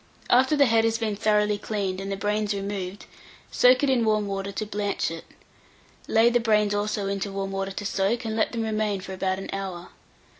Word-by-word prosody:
After 260 +4 +5
the 285 -1 +5
head 225 -2 +3
has 225 0 +1
been 220 -3 -2
thoroughly 210 -1 +2
cleaned, 195 -3 -3
and 195 0 -5
the 195 - -2
brains 210 0 -1
removed, 195 -1 -5 0.5
soak 250 +2 +5
it 285 - +3
in 245 -3 +2
warm 215 -1 +2
water 195 0 -3
to 215 +2 -4
blanch 205 -4 -2
it. 165 0 -8 0.8
Lay 225 +1 +4
the 240 - +3
brains 210 -3 +2
also 205 0 -1
into 200 0 -2
warm 195 0 -3
water 195 0 -2
to 200 +1 -6
soak, 200 +5 0
and 220 -1 -2
let 220 - +1
them 230 -2 -2
remain 215 -3 -1
for 190 0 -7
about 190 0 -1
an 195 - -7
hour. 190 -3 -5
205 Hz, 210 wpm, -25 LUFS, 195-220 Hz, 0.8 s, After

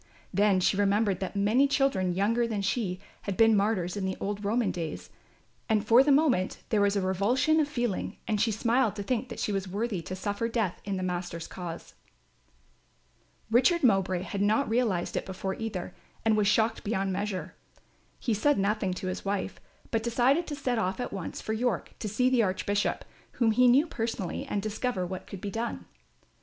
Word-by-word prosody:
Then 200 0 +3
she 185 - +2
remembered 200 -1 +2
that 190 +1 -4
many 215 +8 +3
children 235 -11 +1
younger 230 +5 +2
than 210 -3 -2
she 195 -2 -1 0.2
had 200 -3 -4
been 225 -1 +6
martyrs 195 -3 +1
in 200 - -3
the 190 0 -2
old 205 +1 -3
Roman 215 0 +1
days, 165 -3 -5 0.6
and 215 -1 +2
for 235 +4 +7
the 290 - +3
moment 270 -10 +2
there 215 -2 +2
was 200 0 +3
a 200 - +1
revulsion 210 - +2
of 300 - +2
feeling 240 -8 -2
and 210 -3 +1
she 225 0 +2
smiled 230 +1 +1
to 205 - -4
think 245 +3 -1
that 235 - -7
she - - -1
was 195 -1 -2
worthy 200 0 -2
to 185 +3 -6
suffer 205 +4 -2
death 225 -6 -1
in 195 -1 -2
the 185 - -3
Master's 175 -2 -3
cause. 170 -2 -7 1.6
Richard 265 +8 +4
Mowbray 190 -6 +3
had 200 +1 -4
not 215 +7 +2
realised 220 -7 0
it - - -1
before 190 0 -3
either, 205 -5 -5 0.3
and 220 -1 +4
was 210 -1 +2
shocked 220 +2 +2
beyond 195 -3 -1
measure. 200 -1 -3 0.6
He 235 - -1
said 285 +8 +2
nothing 195 -2 0
to 185 - -6
his 185 - -4
wife, 200 0 -3 0.3
but 225 - +1
decided 250 +8 +2
to 295 - -4
set 255 -5 -1
off 190 0 -1
at 245 - -4
once 190 -4 -5
for 220 - -3
York 225 -3 -1
to 215 - -3
see 250 +5 +2
the 255 -2 +4
Archbishop, 200 0 0 0.3
whom 230 -3 +2
he 250 +3 +5
knew 265 +6 +5
personally, 225 - -3
and 200 - -2
discover 215 -2 -2
what 185 +1 -6
could 195 - -8
be 200 - -4
done. 230 +3 -4
210 Hz, 195 wpm, -28 LUFS, 190-235 Hz, 1.6 s, for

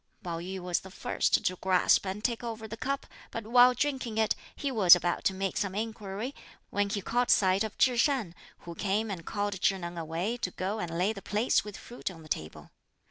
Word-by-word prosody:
Pao 170 -2 -3
yü 185 +2 -5
was 180 -1 0
the 190 - -12
first 190 - 0
to 185 - +1
grasp 185 +1 +3
and 195 +3 -4
take 235 0 -1
over 225 -2 -5
the 220 - -6
cup, 275 +4 -2 0.2
but 230 -2 -6
while 245 +2 +6
drinking 255 -4 -1
it, 220 -1 +3 0.2
he 280 - -2
was 190 -8 +8
about 175 0 -1
to 195 - +3
make 195 0 -2
some 195 -2 -1
inquiry, 220 +2 -4 0.4
when 205 0 +1
he 200 -2 -2
caught 245 +4 0
sight 190 +1 +4
of 220 - -5
Chih 250 -2 +4
Shan, 245 - +1 0.3
who 170 - -8
came 205 +4 -1
and 175 -4 -5
called 205 -2 -2
Chih 195 - +3
Neng 175 -1 -5
away 165 +8 -2
to 210 - -2
go 190 +4 -3
and 170 -3 -3
lay 190 +5 +2
the 195 - -9
plates 210 +5 +1
with 210 -2 -8
fruit 240 - -6
on 165 -3 -11
the 155 - -14
table. 80 - -5
200 Hz, 220 wpm, -29 LUFS, 185-225 Hz, 0.4 s, was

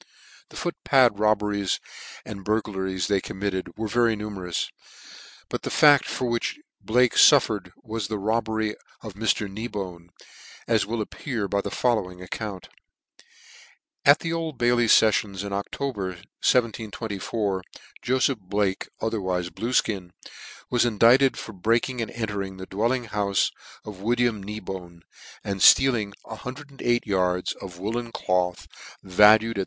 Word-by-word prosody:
The - - -15
foot 175 - -3
pad 125 -7 +4
robberies 105 -2 +1 0.5
and 100 -2 -8
burglaries 95 -3 -1
they 100 -2 +1
committed 95 -1 -4
were 110 0 -2
very 115 +1 +2
numerous, 100 -5 -4 0.8
but - - -4
the - - -4
fact 145 -3 +6
for 130 - -3
which 120 - -2 0.2
Blake 125 +1 +3
fullered 110 -10 +5
was 110 -3 -4
the 110 0 -3
robbery 110 +1 -1 0.3
of 110 -3 -7
Mr. 105 0 0
Kneebone, 95 -5 -6 0.6
as 110 -4 +2
will 115 0 -2
appear 115 -2 -4
by 100 0 0
the - - -4
following 105 -8 0
account. 95 +1 -6 1.4
At 145 +2 +6
the 165 0 -2
Old 165 -4 -3
Bailey 120 0 +3
feffions, 105 -3 +3
in 100 -1 -5
October, 100 +2 -3 0.3
1724, 110 -4 -1 0.4
Jofeph 130 0 +1
Blake 100 0 -1 0.2
otherwife 95 -5 -1
Bluefkin, 110 -6 -1 0.6
was 120 - +3
indicted 120 +4 +4
for 110 - -7
breaking 115 +6 0
and 115 - -3
entering 100 -4 -4
the 95 - -7
dwelling 115 +7 0
houfe 100 -2 +1 0.3
of 100 -3 -9
William 120 -1 +1
Kneebone, 95 -4 -7 0.4
and 100 -2 -3
ftealing 120 -7 +5
108 125 +1 -3
yards 90 -3 0
of 90 -3 -10
woollen 115 +5 -3
cloth, 90 -3 -1 0.4
value 105 +4 +6
36!. 100 - -4
105 Hz, 130 wpm, -25 LUFS, 95-120 Hz, 1.4 s, fact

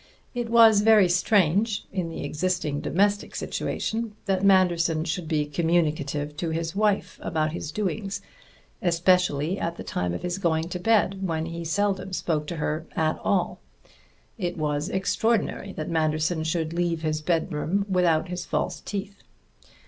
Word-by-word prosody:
It 240 -2 -3
was 225 -3 +7
very 215 -3 +6
strange, 195 +3 +2
in 180 -4 -2
the 165 - -6
existing 155 -1 -1
domestic 205 +3 +1
situation, 225 -1 -3
that 195 -2 0
Manderson 175 -4 +3
should 165 0 -3
be 155 -2 +1
communicative 150 -2 0
to 165 +1 -2
his 165 +2 -3
wife 210 -1 0
about 155 -2 -1
his 160 -2 -5
doings, 200 +1 -2 0.6
especially 175 -2 +2
at 170 0 -2
the - - -6
time 90 -1 -2
of - - -6
his 180 +1 -2
going 165 -2 0
to 180 - -4
bed, 200 -1 +2
when 160 -1 -1
he 170 0 -5
seldom 190 +2 -1
spoke 155 -4 -1
to 170 - -4
her 155 +1 -2
at 155 -1 0
all. - - 0 0.8
It 175 -1 -2
was 150 -1 -1
extraordinary 200 +1 0
that 155 - -5
Manderson 155 0 0
should 160 0 -1
leave 170 -1 -1
his 155 -1 -1
bedroom 165 +3 0
without 180 -3 +2
his 180 -1 -4
false 150 - -2
teeth. 200 0 -6
175 Hz, 150 wpm, -25 LUFS, 155-195 Hz, 0.8 s, was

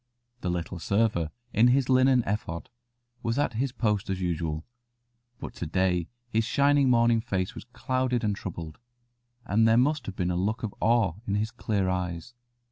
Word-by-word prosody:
The 90 - -3
little 90 +1 -3
server 100 -3 +1 0.2
in 110 +4 +5
his 130 +1 +3
linen 130 -1 +4
ephod 90 -5 -3 0.5
was 115 +1 -1
at 145 -4 +1
his 125 +4 -1
post 105 -6 -1
as 95 -1 -1
usual, 80 -3 -2 0.7
but - - -7
to 85 - -4
day 90 0 +1 0.2
his 115 -2 +1
shining 140 +3 +3
morning 115 -1 +4
face 95 -5 -2
was - - -9
clouded 125 0 -1
and 105 -2 +1
troubled, 85 -5 -7 0.7
and 110 +3 +3
there 115 +1 +5
must 140 +1 +2
have 100 - -5
been 90 -2 -1
a - - -1
look 105 +7 -1
of 110 - -3
awe 110 -5 +3
in 100 - 0
his 110 +2 -1
clear 105 -5 -1
eyes. 90 +3 -3
105 Hz, 175 wpm, -27 LUFS, 90-120 Hz, 0.7 s, in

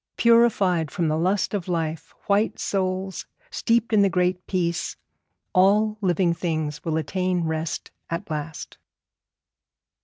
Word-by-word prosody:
Purified 205 -9 +4
from 165 +3 -1
the 155 - +1
lust 185 +6 0
of 195 -4 -2
life, 165 -3 -2
white 205 +2 +2
souls 190 -1 -2 0.2
steeped 230 0 +1
in 210 - +5
the 200 - +4
Great 180 -1 0
Peace, 170 -3 -1 0.6
all 210 +3 +3
living 180 -2 +2
things 155 -3 -3
will 160 -1 -1
attain 180 +2 -1
rest 160 0 -3 0.2
at 170 +4 -4
last. 155 +1 -5
180 Hz, 125 wpm, -24 LUFS, 165-200 Hz, 0.6 s, in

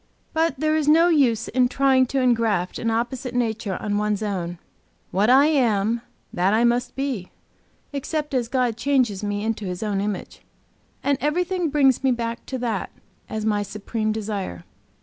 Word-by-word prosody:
But 325 +1 +1
there 310 0 +2
is 310 -2 0
no 330 +3 +6
use 255 -9 +3
in 250 0 +2
trying 265 -1 +3
to 270 - -1
engraft 225 -7 +1
an 230 - -1
opposite 245 +2 -2
nature 220 -5 -1
on 205 -1 -1
one's 210 0 0
own. 180 -4 -3 0.5
What 205 +4 +2
I 270 +3 +7
am, 235 -6 +2 0.3
that 190 +4 +2
I 230 - +3
must 240 +1 +1
be, 265 -9 -3 0.6
except 295 +1 -3
as 245 -3 +1
God 245 -2 0
changes 240 -6 +1
me 205 0 -2
into 220 -1 -2
His 180 +2 -4
own 205 -2 -1
image. 205 -2 -4 0.6
And 280 -1 +1
everything 355 +4 0
brings 275 -3 +3
me 265 - +3
back 235 -1 -2
to 260 - -3
that, 230 -6 -2 0.4
as 215 0 -3
my 210 -1 +1
supreme 215 +2 -3
desire. 205 - -4
235 Hz, 170 wpm, -23 LUFS, 210-270 Hz, 0.6 s, I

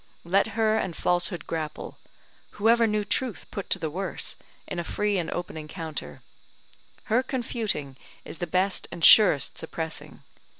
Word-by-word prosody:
Let 200 +5 +1
her 220 -1 +3
and 180 -5 -3
Falsehood 175 -1 0
grapple; 155 -2 -5 0.5
who 210 +2 +2
ever 230 0 +5
knew 210 -1 0
Truth 245 +2 -2
put 200 - -5
to - - +3
the 160 -2 -3
worse, 185 +2 -4 0.3
in 180 - -4
a - - -1
free 205 +3 0
and 165 - -3
open 175 -2 -4
encounter? 155 - -6 0.8
Her 230 +4 +2
confuting 225 - -3 0.3
is - - -8
the 175 - -2
best 185 +3 +1
and 165 - +1
surest 180 -11 +7
suppressing. 160 0 -5
180 Hz, 155 wpm, -26 LUFS, 160-215 Hz, 0.8 s, surest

